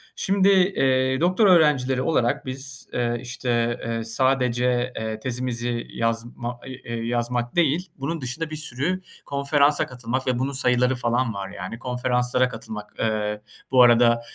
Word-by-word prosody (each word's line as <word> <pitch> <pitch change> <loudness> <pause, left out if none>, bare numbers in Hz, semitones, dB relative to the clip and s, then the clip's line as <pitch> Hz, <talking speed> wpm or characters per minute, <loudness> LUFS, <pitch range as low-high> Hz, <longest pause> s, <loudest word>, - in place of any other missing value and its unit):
Şimdi, 195 0 +2
eee, 135 -9 +3
doktora 185 +4 +4
öğrencileri 135 -6 +4
olarak 130 -4 +1
biz, 135 +1 -7
eee, 120 -1 0
işte, 120 -1 -1
eee, 115 0 -2
sadece, 125 +1 +1
eee, 110 0 -4
tezimizi 120 -1 -3
yazma, 120 +1 -3
i 130 0 -9
e 115 - -2
yazmak 120 0 -1
değil, 170 +2 +1
bunun 150 +3 -3
dışında 150 +6 -4
bir 155 - -5
sürü 155 +5 -2 0.2
konferansa 140 +1 +2
katılmak 125 +1 -4
ve 125 -1 +1
bunun 135 +2 -1
sayıları 125 -1 +2
falan 120 -1 0
var 100 -1 -5
yani, 95 +6 -7
konferanslara 125 0 0
katılmak. 110 -2 -8
Iıı, 105 -1 -1 0.3
bu 130 - +6
arada, 120 -1 +5
125 Hz, 140 wpm, -24 LUFS, 120-135 Hz, 0.3 s, bu